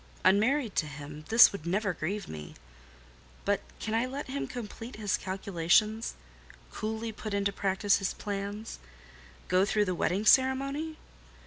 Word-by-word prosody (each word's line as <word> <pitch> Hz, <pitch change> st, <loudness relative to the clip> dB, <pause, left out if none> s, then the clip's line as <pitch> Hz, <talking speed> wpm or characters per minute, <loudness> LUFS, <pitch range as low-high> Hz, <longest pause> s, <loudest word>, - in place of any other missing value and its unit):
Unmarried 220 Hz, +5 st, +3 dB
to 155 Hz, -, +1 dB
him, 145 Hz, +1 st, -9 dB
this 225 Hz, +1 st, +8 dB
would 170 Hz, -5 st, -7 dB
never 200 Hz, +2 st, 0 dB
grieve 195 Hz, +6 st, -3 dB
me; 75 Hz, -1 st, -8 dB, 0.9 s
but 200 Hz, 0 st, +1 dB, 0.2 s
can 220 Hz, -, -3 dB
I 230 Hz, +3 st, +2 dB
let 275 Hz, +3 st, -5 dB
him 275 Hz, +2 st, -3 dB
complete 235 Hz, +1 st, -7 dB
his 210 Hz, -3 st, 0 dB
calculations—coolly 190 Hz, -, -2 dB
put 215 Hz, -1 st, -5 dB
into 200 Hz, 0 st, 0 dB
practice 200 Hz, +1 st, +2 dB
his 195 Hz, -, -2 dB
plans—go 65 Hz, -, -4 dB
through 210 Hz, +1 st, +2 dB
the 185 Hz, -, -1 dB
wedding 180 Hz, +4 st, 0 dB
ceremony? 275 Hz, +6 st, +3 dB
200 Hz, 130 wpm, -30 LUFS, 170-225 Hz, 0.9 s, this